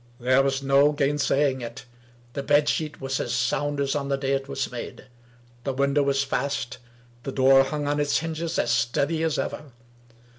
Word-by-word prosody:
There 130 +2 +3
was 135 0 0
no 140 +2 +4
gainsaying 140 -2 +1
it. 120 +1 -8 0.5
The 140 - -3
bed 145 +1 +3
sheet 150 -3 -1
was 135 0 -2
as - - -3
sound 140 +4 0
as 140 -1 0
on 140 -1 -2
the 140 - +1
day 135 0 -2
it 135 0 -1
was 135 -2 -3
made. 125 +1 -7 0.6
The 135 - -2
window 140 +2 +2
was 140 -1 +1
fast. 135 -3 -2 0.4
The 135 - -5
door 135 0 +5
hung 145 0 -3
on 145 0 0
its 145 -1 +2
hinges 165 +1 -3
as - - +1
steady 140 +5 +1
as 160 -2 0
ever. 150 -4 -4
140 Hz, 185 wpm, -25 LUFS, 135-145 Hz, 0.6 s, door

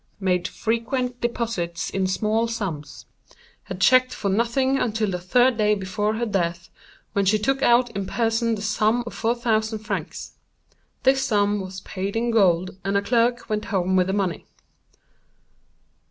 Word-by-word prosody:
Made 180 -3 0
frequent 245 +2 -2
deposits 225 -9 -2
in 190 -1 0
small 215 +4 0
sums. 185 -11 -5 0.6
Had 185 -1 -7
checked 255 +5 +4
for 200 - -2
nothing 240 +6 +1
until 215 -3 0
the 180 - -2
third 245 +6 +3
day 210 0 +3
before 205 +2 -2
her 235 +2 -1
death, 170 -5 -2 0.4
when 200 - +1
she 200 +3 +3
took 270 +6 0
out 240 0 +4
in 195 -2 -4
person 225 +2 0
the 205 - -6
sum 215 +3 +1
of 235 - -7
4000 225 -1 0
francs. 215 +1 -5 0.7
This 265 0 +3
sum 205 -3 +1
was 190 0 -7
paid 195 +2 -5
in 235 +1 0
gold, 185 -4 +2
and 195 +1 0
a - - +2
clerk 240 +2 +1
went 210 0 -2
home 190 -2 0
with 185 -1 +3
the 190 - -1
money. 190 -5 -2
215 Hz, 155 wpm, -23 LUFS, 190-235 Hz, 0.7 s, checked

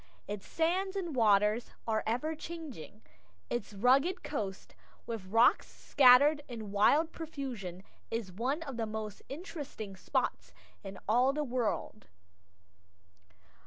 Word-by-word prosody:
Its 205 -1 -6
sands 370 +4 0
and 345 -7 -3
waters 210 0 +3 0.2
are 220 -1 +1
ever 250 +8 0
changing. 310 - -9 0.5
Its 240 -4 -2
rugged 270 - +3
coast, 200 -9 -5 0.3
with 225 -5 -5
rocks 230 +5 +4
scattered 285 +3 +5
in 220 -5 -7
wild 290 +11 +4
profusion, 250 - -6 0.3
is 225 -4 -3
one 260 - -2
of 275 -6 -7
the 225 -1 -1
most 215 -1 -5
interesting 285 - -7
spots 185 - -2 0.3
in 195 -1 -8
all 245 +5 +4
the 300 +1 -1
world. 240 -4 -2
240 Hz, 120 wpm, -32 LUFS, 210-300 Hz, 0.5 s, scattered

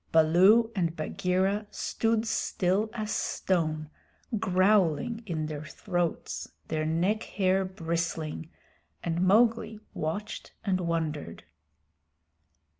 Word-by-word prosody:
Baloo 185 +9 +5
and 170 -4 0
Bagheera 185 +6 0
stood 225 0 0
still 205 -1 0
as 215 -2 -4
stone, 155 -4 -1 0.5
growling 190 +3 +2
in 160 -4 -2
their 155 -1 -5
throats, 175 +1 -3 0.2
their 155 0 -1
neck 180 +7 +1
hair 190 -2 +1
bristling, 165 -3 -3 0.5
and 170 0 -1
Mowgli 220 +2 +3
watched 200 +7 -4
and 185 -2 +1
wondered. 160 - -2
180 Hz, 95 wpm, -29 LUFS, 160-210 Hz, 0.5 s, Baloo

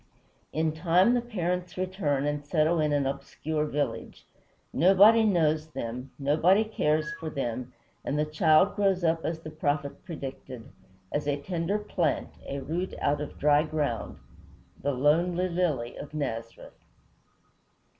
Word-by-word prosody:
In 160 0 0
time 175 +7 +3
the 245 - +2
parents 180 -6 -3
return 180 -7 -1
and 145 0 -2
settle 160 +2 +2
in 150 -1 +1
an 145 -1 +1
obscure 150 +3 -3
village. 145 - -3 0.5
Nobody 195 +8 +6
knows 160 -6 +2
them, 125 -3 -6
nobody 160 +9 +3
cares 155 -7 0
for 160 - -4
them, 130 -4 -4 0.3
and 145 - -2
the 150 - +2
child 155 +4 +3
grows 195 -3 +1
up 165 0 +1
as 160 0 -3
the 155 - -8
prophet 145 -2 -2
predicted, 135 -7 -8 0.4
"As 145 0 -2
a 145 -1 +1
tender 170 +5 -1
plant, 180 -7 -1 0.2
a 140 0 -4
root 170 +7 -3
out 145 0 +1
of 150 - -6
dry 150 0 +4
ground;" 150 -7 -2 0.6
the 145 - 0
lonely 170 +7 +2
lily 165 -9 -1
of 150 +1 -8
Nazareth. 115 -6 -5
155 Hz, 140 wpm, -28 LUFS, 145-180 Hz, 0.6 s, Nobody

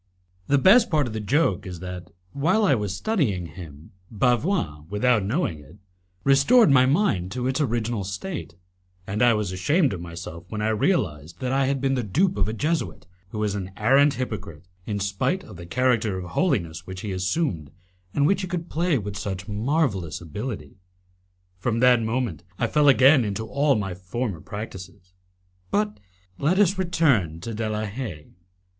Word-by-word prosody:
The 140 - +4
best 215 - +6
part 150 -4 +2
of 120 - -5
the 110 - -3
joke 105 - +1
is 90 -2 -7
that, 90 0 -7 0.2
while 185 - +2
I 185 - +4
was 105 -5 -2
studying 120 - 0
him, 80 -4 -11 0.2
Bavois, 120 - 0
without 110 +1 +2
knowing 105 - -1
it, 75 +6 -16 0.5
restored 140 - +5
my 130 -1 +6
mind 130 - +1
to 125 0 -3
its 130 +4 0
original 115 -5 -1
state, 100 - -5 0.5
and 100 +4 -3
I 120 -2 +5
was 105 -3 -2
ashamed 140 - +2
of 90 - -6
myself 85 0 -8
when 110 - -4
I 105 +1 0
realized 90 - 0
that 125 - -1
I 135 0 +2
had 135 0 0
been 135 0 +1
the 130 - 0
dupe 155 - +1
of 100 -1 0
a 110 - -2
Jesuit 155 +8 -2 0.2
who 105 - -7
was 105 -1 0
an 95 -2 -4
arrant 135 +6 +4
hypocrite, 100 -10 -5 0.2
in 105 -1 -2
spite 100 - -1
of 105 - -12
the 85 0 -9
character 115 -2 +1
of 90 -1 -7
holiness 95 - -1
which 95 -1 -7
he 105 - -4
assumed, 90 - -1 0.4
and 145 - +1
which 195 +4 +2
he 185 - -3
could 175 -1 -4
play 170 -1 +1
with 100 -3 -5
such 95 -1 -5
marvellous 105 - -1
ability. 90 - -6 0.8
From 115 +4 -1
that 125 -2 +5
moment 110 - -2 0.2
I - - +1
fell 150 -1 +3
again 135 0 +6
into 105 +1 -3
all 140 +4 +2
my 100 -4 -2
former 95 +1 -4
practices. 95 -4 -9 0.6
But 210 0 0 0.4
let 165 +6 +2
us 195 -1 +3
return 140 - +2
to 115 +4 -5
De 110 0 -2
la 110 0 -2
Haye. 100 - -6
110 Hz, 175 wpm, -24 LUFS, 95-140 Hz, 0.8 s, best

